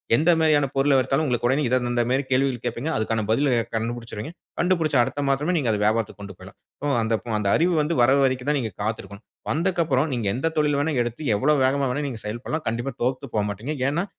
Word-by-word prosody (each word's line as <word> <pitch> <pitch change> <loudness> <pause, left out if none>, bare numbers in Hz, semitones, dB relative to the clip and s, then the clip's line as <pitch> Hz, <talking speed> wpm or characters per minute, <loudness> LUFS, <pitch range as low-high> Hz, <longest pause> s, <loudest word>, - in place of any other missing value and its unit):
எந்த 160 +8 +2
மாதிரியான 150 -3 +3
பொருளை 135 +1 +3
எடுத்தாலும் 135 +4 +1
உங்களுக்கு 120 -3 0
உடனே 140 +3 +2
இதை 130 +1 +3
இந்த 120 0 +1
மாதிரி 135 +2 +1
கேள்விகள் 130 -2 +1
கேட்பீங்க. 120 +6 -2
அதற்கான 110 0 -1
பதிலை 135 +3 +2 0.2
கண்டுபிடிச்சிருவீங்க. 115 +4 -4 0.3
கண்டுபிடிச்ச 165 -4 +1
அடுத்த 135 +3 -3
மாசமே 145 +6 +1
நீங்க 130 -7 +1
அதை 105 - -1
வியாபாரத்திற்கு 110 -1 0
கொண்டு 100 -1 -9
போயிரலாம். - - -13 0.3
ஓ 145 -1 +1
அந்த 110 0 +1
அப் 110 - -18
அந்த 100 -2 0
அறிவு 175 +2 +2
வந்து 155 +3 -1
வர்ற 130 +3 +5
வரைக்கும் 130 +1 -1
தான் 145 - +1
நீங்க 110 -3 -4
காத்திருக்கணும். 100 -1 -5 0.3
வந்தக்கப்புறம் 160 -4 +1
நீங்க 115 -4 -2
எந்த 160 +6 -1
தொழில் 150 -1 +2
வேணா 160 +2 0
எடுத்து, 120 +4 -6 0.2
எவ்வளவு 145 +2 +2
வேகமா 135 +1 +1
வேணாலும் 145 +3 -2
நீங்க 115 -4 -7
செயல்படலாம். 120 +9 -4
கண்டிப்பா 120 +4 -3
தோத்து 130 +2 -1
போகமாட்டீங்க. 105 +7 -2
ஏன்னா 165 +6 0
130 Hz, 205 wpm, -24 LUFS, 115-150 Hz, 0.3 s, வர்ற